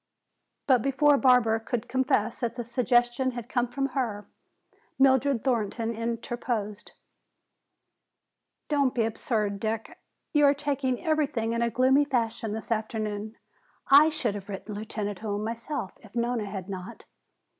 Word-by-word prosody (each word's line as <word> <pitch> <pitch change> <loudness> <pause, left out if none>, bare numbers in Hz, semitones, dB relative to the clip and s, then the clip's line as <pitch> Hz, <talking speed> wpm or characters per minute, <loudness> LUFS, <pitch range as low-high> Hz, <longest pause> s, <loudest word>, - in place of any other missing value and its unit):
But 255 -4 +4
before 275 +3 +4
Barbara 250 -4 +4
could 225 0 -3
confess 250 -4 0
that 235 -2 -2
the 240 - -4
suggestion 245 +1 +1
had 240 -1 -6
come 245 -2 0
from 275 +3 -2
her, 230 -6 -2 0.7
Mildred 265 -2 +3
Thornton 230 -2 -1
interposed. 230 -2 -4 1.7
"Don't 280 -4 +1
be 235 - +2
absurd, 215 -2 -1
Dick. 220 +1 -3 0.3
You 295 -1 +5
are 280 0 +5
taking 280 -1 -2
everything 280 -8 0
in 235 - -1
a 235 - +2
gloomy 260 +4 +4
fashion 230 -5 -1
this 220 +1 -6
afternoon. 215 -1 -3 0.5
I 295 +3 +8
should 300 -9 -1
have 200 0 -8
written 200 +2 -6
Lieutenant 205 -1 -4
Hume 210 -1 -3
myself 230 -1 -4
if 215 +1 -17
Nona 235 -2 0
had 190 -2 -6
not. 190 -2 -8
235 Hz, 135 wpm, -27 LUFS, 215-260 Hz, 1.7 s, I